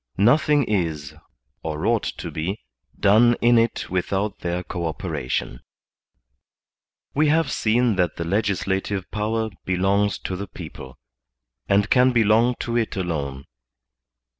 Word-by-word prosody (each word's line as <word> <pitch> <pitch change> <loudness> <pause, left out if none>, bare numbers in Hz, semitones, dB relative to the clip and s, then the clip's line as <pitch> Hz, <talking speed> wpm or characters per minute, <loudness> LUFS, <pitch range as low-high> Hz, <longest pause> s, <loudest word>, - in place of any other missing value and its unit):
Nothing 145 +7 +4
is, 80 - -2 0.5
or 75 -1 -4
ought - - +2
to - - -5
be, 90 +7 -3 0.4
done 120 +4 +5
in 120 0 +5
it 115 0 -1
without 95 +3 -1
their 90 +1 -3
co 85 -2 -4
operation. 65 -5 -3 1.5
We 150 +2 +3
have 155 -1 +2
seen 115 -1 +1
that 90 -3 +1
the 85 - -4
legislative 95 0 -1
power 110 +1 -1
belongs 95 +2 +1
to 95 - -4
the 100 +2 -5
people, 65 -7 -10 0.7
and 100 +1 +3
can 125 0 +5
belong 115 +2 +3
to 115 - -3
it 115 -2 -1
alone. 70 -7 -3
100 Hz, 125 wpm, -23 LUFS, 90-115 Hz, 1.5 s, done